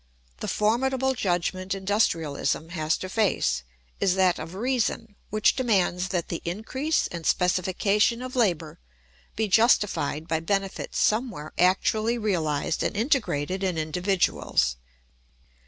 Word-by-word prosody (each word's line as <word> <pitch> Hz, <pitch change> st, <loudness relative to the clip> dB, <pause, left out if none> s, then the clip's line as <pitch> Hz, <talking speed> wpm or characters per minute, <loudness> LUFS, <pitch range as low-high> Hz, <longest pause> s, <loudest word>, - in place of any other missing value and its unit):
The -, -, -4 dB
formidable 265 Hz, +5 st, +1 dB
judgment 185 Hz, -2 st, -1 dB
industrialism 165 Hz, -6 st, 0 dB
has 160 Hz, -2 st, -1 dB
to 185 Hz, -, -6 dB
face 200 Hz, -, +1 dB, 0.4 s
is 185 Hz, -, +2 dB
that 185 Hz, -2 st, +3 dB
of 165 Hz, +3 st, -7 dB
reason, 230 Hz, -1 st, -1 dB, 0.2 s
which 215 Hz, 0 st, +3 dB
demands 190 Hz, -7 st, +1 dB
that 180 Hz, -3 st, -2 dB
the 170 Hz, -, -4 dB
increase 260 Hz, -, -1 dB
and 170 Hz, -2 st, -6 dB
specification 195 Hz, +7 st, +1 dB
of 255 Hz, 0 st, -7 dB
labour 175 Hz, -, 0 dB, 0.6 s
be 220 Hz, 0 st, 0 dB
justified 200 Hz, -, +2 dB
by 160 Hz, 0 st, 0 dB
benefits 195 Hz, +3 st, -2 dB
somewhere 215 Hz, -, 0 dB
actually 215 Hz, +6 st, +2 dB
realised 165 Hz, -9 st, -1 dB
and -, -, -1 dB
integrated 195 Hz, -, 0 dB
in 185 Hz, -3 st, 0 dB
individuals. 160 Hz, -, 0 dB
190 Hz, 120 wpm, -26 LUFS, 170-220 Hz, 0.6 s, that